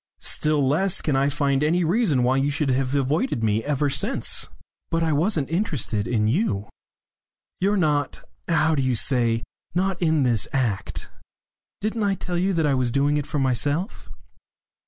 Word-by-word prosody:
Still 150 -3 +1
less 175 +7 +1
can 150 - -1
I 135 +1 +2
find 140 -1 0
any 170 +4 +2
reason 170 - +2
why 130 +2 +2
you 135 +1 +1
should 145 -1 0
have 130 +1 0
avoided 140 - 0
me 110 0 +1
ever 145 0 0
since?" 135 - 0 0.4
"But 165 0 0
I 160 -1 +1
wasn't 155 -2 +1
interested 145 - -1
in 110 -3 +1
you. 110 - 0 0.9
You're 200 +3 +1
not 150 -5 0 0.2
what 160 -2 +2
do - - +2
you 130 -1 +1
say? 115 -2 +2 0.3
not 185 0 0
on 170 - +2
in 155 -3 +2
this 120 -4 +1
act. 120 -7 -2 0.7
Didn't 220 +2 -2
I 200 -1 +1
tell 175 -1 -3
you 190 +2 +1
that 165 -3 +1
I 145 - +2
was 130 -2 +1
doing 140 +4 +1
it 145 - -3
for - - -3
myself?" 145 - 0
145 Hz, 175 wpm, -23 LUFS, 130-170 Hz, 0.9 s, I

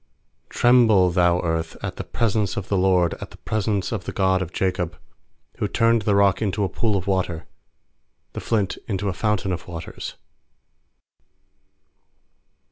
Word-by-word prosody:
7Tremble, 110 -7 +4
thou 90 -1 +3
earth, 80 -1 -2
at - - -4
the - - -4
pres 115 -3 -1
ence 105 -4 0
of 105 - -4
the 100 - +1
Lord, 90 -3 +3
At - - -6
the - - -15
presence 105 -2 -1
of 110 -6 -4
the - - -4
God 95 -1 +1
of 90 -2 -4
Jacob; 90 -4 -1 0.6
8Who - - -1
turned 115 0 +3
the 100 0 +1
rock 100 0 +3
into 105 -1 0
a 95 - 0
pool 110 +3 0
of 95 - -4
water, 95 -4 -1 0.9
The - - -5
flint 105 -5 -1
into 100 -1 -1
a - - -2
fountain 95 0 -1
of 90 -1 -5
waters. 85 -2 -7
95 Hz, 160 wpm, -23 LUFS, 90-105 Hz, 0.9 s, 7Tremble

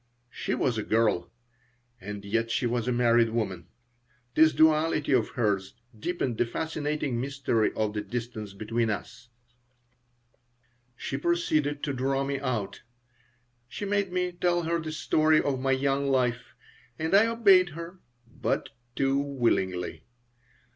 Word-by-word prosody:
She - - -2
was 120 -4 0
a - - -2
girl, 110 -4 +1 0.7
and 100 0 -7
yet 115 +3 0
she 120 +2 0
was 120 0 -1
a - - +2
married 120 -1 +3
woman. 95 -7 -3 0.7
This 155 +3 +6
duality 155 -1 +3
of 125 -5 +3
hers 100 -5 -1 0.2
deepened 130 -5 -2
the - - +3
fascinating 150 -3 -2
mystery 135 -5 0
of 110 -1 -1
the 105 - -2
distance 115 -4 -6
between 115 +3 -1
us 115 +3 -6 1.7
She 135 - -4
proceeded 150 -2 0
to 140 - -1
draw 135 +1 0
me 140 0 -2
out. 120 -8 -3 0.9
She 205 - -6
made 200 -2 0
me 180 0 0
tell 175 0 0
her 170 +1 0
the 155 -1 -5
story 155 0 +3
of 135 -2 -1
my 135 +1 0
young 140 +1 +1
life, 125 -3 0 0.4
and 160 +3 -2
I 205 +3 +6
obeyed 200 -6 +5
her 170 +3 -9 0.3
but 125 +1 -2 0.3
too 135 0 +2
willingly. 115 -10 -1
135 Hz, 140 wpm, -27 LUFS, 115-155 Hz, 1.7 s, This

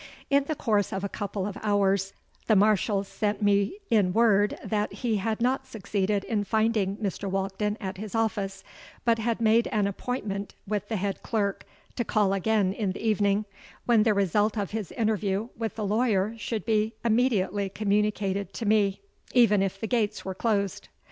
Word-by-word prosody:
"In 280 0 +4
the 310 - -2
course 210 -7 +1
of 190 0 -3
a - - 0
couple 200 -1 -3
of 205 -1 -5
hours 200 -2 +1 0.3
the 220 - +5
Marshal 205 0 +3
sent 210 +1 -2
me 200 - +2
in 200 -5 +3
word 210 -2 +3
that 210 -1 -1
he 230 -4 -1
had 215 +2 -1
not 260 +2 0
succeeded 200 -3 -1
in 210 -2 -1
finding 215 -2 +1
Mr. 200 -1 -3
Walkden 195 +2 -1
at 190 -2 -5
his 215 +1 -6
office, 200 -3 -1 0.4
but 230 -1 +3
had 230 0 -1
made 225 +1 +4
an 210 -2 +1
appointment 200 -1 -3
with 205 0 -2
the 225 - -2
head 195 0 -2
clerk 205 -3 -2 0.3
to 240 - +1
call 210 -3 +2
again 195 -1 +1
in 200 -3 -2
the 225 - -4
evening, 205 -1 +2 0.4
when 235 -3 +4
the 215 -1 +3
result 205 +3 +1
of 200 -2 -2
his 215 -3 -4
interview 215 -1 0
with 225 -1 -4
the 215 - -3
lawyer 210 -1 +1
should 225 -1 -4
be 220 0 +1
immediately 210 -4 +1
communicated 200 -1 0
to 230 - -4
me, 205 -2 +2 0.3
even 220 -5 +5
if 195 0 -1
the 220 - -3
gates 220 -3 -1
were 190 - -3
closed. 200 -2 -1
210 Hz, 175 wpm, -27 LUFS, 195-220 Hz, 0.4 s, the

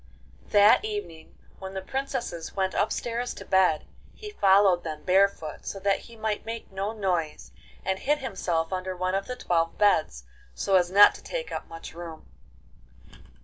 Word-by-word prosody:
VI - - -24
That 205 - +6
evening, 410 - -6 0.2
when 190 0 -8
the 190 - -3
princesses 240 -9 -4
went 190 -1 0
upstairs 240 +1 -1
to - - -10
bed, 185 -5 +3 0.3
he 425 -1 -9
followed 195 - +4
them 155 -2 -6
barefoot, 185 -4 +1
so 195 - -4
that 200 0 +2
he 235 - -13
might 220 -1 -2
make 225 -1 -7
no 195 +2 -3
noise, 175 - -2 0.3
and 190 0 -1
hid 295 +2 +1
himself 180 - -2
under 185 0 -3
one 185 +1 -1
of 195 0 -1
the 250 - -4
twelve 165 -7 0
beds, 160 - +2 0.3
so 195 - -1
as 175 -1 +4
not 200 +2 +8
to - - -12
take - - -5
up - - -5
much 165 0 -10
room. 165 -2 -9
190 Hz, 170 wpm, -26 LUFS, 175-215 Hz, 0.3 s, not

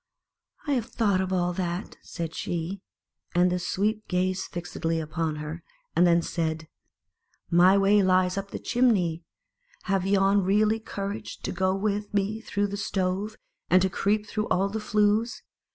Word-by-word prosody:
"I 290 - -1
have 245 -5 0
thought 205 -6 +1
of 190 0 -2
all 180 -1 +1
that," 175 +1 -3
said 165 -1 -5
she. 175 +4 -3 0.5
And 180 +1 +4
the 180 - 0
Sweep 210 +5 -1
gazed 185 +1 0
fixedly 165 -2 -3
upon 160 0 -2
her, 150 0 -5
ill - - -3
rod 170 - -9 0.3
and 175 - +5
then 170 0 +4
said, 160 -2 -2 0.4
" - - -44
My 180 +3 +6
way 200 +1 +4
lies 185 -1 +3
up 195 0 -4
the - - -5
chim 250 +1 +2
ney. 170 -7 +1 0.6
Have 195 -2 0
yon 195 0 +4
really 210 +3 +3
courage 205 0 -5
to - - -2
go 185 +1 +1
with 205 +1 -2
me 205 +2 0
through 205 -2 -1
the 200 0 -4
stove, 195 +1 -1 0.3
and 185 - +6
to 190 - +1
creep 210 +4 +1
through 215 -1 -2
all 195 +2 +1
the 220 +2 -3
flues? 210 +2 +1
195 Hz, 175 wpm, -26 LUFS, 175-205 Hz, 0.6 s, My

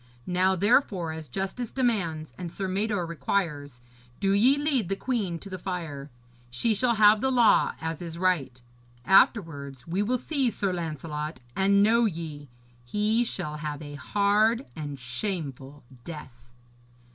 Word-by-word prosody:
Now, 185 +1 +2
therefore, 195 - +2
as 160 -1 -7
justice 195 +5 -3
demands, 170 - -1
and 170 +3 -6
Sir 195 +1 -3
Mador 200 -1 -1
requires, 145 -5 -2 0.4
do 195 -1 +1
ye 240 +8 +5
lead 280 - 0
the 195 - +1
queen 200 -7 -2
to 195 - -11
the 185 -1 -6
fire. 165 -7 -5 0.4
She 125 - +1
shall 235 +3 +2
have 210 0 +6
the 265 - +2
law 240 -3 +4
as 160 0 -4
is 165 -1 -6
right. 170 -9 0 0.5
Afterwards 160 - +3
we 180 +4 0
will 245 +5 +1
seize 260 -3 0
Sir 195 -2 0
Lancelot; 155 -3 -4 0.2
and 200 +1 +4
know 230 +2 +4
ye, 160 - -5 0.3
he 210 - +1
shall 165 -9 -4
have 150 -1 -5
a 145 -1 -8
hard 210 - +2
and 145 -3 -6
shameful 140 - -5 0.2
death.' 125 -7 -10
180 Hz, 145 wpm, -27 LUFS, 150-210 Hz, 0.5 s, have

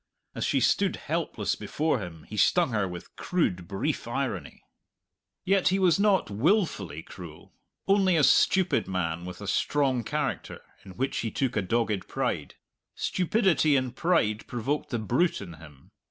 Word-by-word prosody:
As - - -4
she - - +2
stood - - +2
helpless - - -2
before 155 -4 -1
him 85 -5 -8
he 105 - -9
stung 165 - +3
her 105 -4 0
with 90 -1 -9
crude, 95 - -1
brief 115 - -2
irony. 120 - -4 0.8
Yet 195 0 +3
he 190 - +3
was 185 -2 +3
not 200 - +2
wilfully 105 - 0
cruel; 85 -4 -12 0.3
only 195 -3 +4
a 150 - +3
stupid 185 +5 +3
man 85 -2 -2
with 90 +2 -8
a 100 - -6
strong 135 +1 +1
character, 145 +3 -3 0.2
in 95 -2 -12
which 135 +2 -1
he 115 - -1
took 130 +3 -1
a 105 - +2
dogged 105 -1 -1
pride. - - -2 0.4
Stupidity 180 -5 +2
and 130 -2 -1
pride 110 -11 +1
provoked 130 +5 -2
the 120 - -1
brute 125 - +1
in 95 -4 -8
him. 75 -4 -16
120 Hz, 155 wpm, -27 LUFS, -, 0.8 s, only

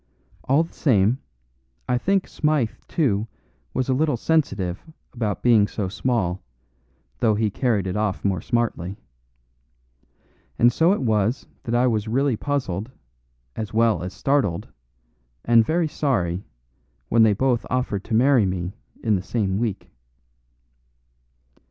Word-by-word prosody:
All 140 +5 +3
the 165 - -12
same, 115 -2 +2 0.7
I 125 0 +1
think 195 +6 +1
Smythe, 150 -7 0 0.2
too, 115 -9 0 0.4
was 130 - -1
a 130 - +2
little 145 0 +1
sensitive 100 - 0 0.3
about 110 -5 -3
being 110 -4 +5
so 100 -3 -3
small, 100 -4 -1 0.8
though 110 -2 +3
he 105 0 0
carried 110 -4 0
it 95 - -3
off 105 -2 -1
more 95 -4 +1
smartly. 105 -5 -1 1.6
And 120 +1 +5
so 165 +6 +4
it 200 - 0
was 110 +1 +1 0.2
that 115 - -1
I 120 +1 +3
was 110 -3 0
really 135 +3 +1
puzzled, 120 -6 -2 0.7
as 110 -1 -5
well 115 -6 +3
as 90 +1 -4
startled, 100 -4 0 0.8
and 115 -1 +6
very 165 +6 +1
sorry, 100 - -1 0.6
when 115 - +4
they 110 -2 +6
both 125 +2 +1
offered 120 -6 -1
to 110 - -1
marry 125 -3 +4
me 90 0 -3 0.3
in 110 -2 +2
the 95 - -1
same 100 -1 -1
week. 110 -4 -3
115 Hz, 135 wpm, -23 LUFS, 100-130 Hz, 1.6 s, and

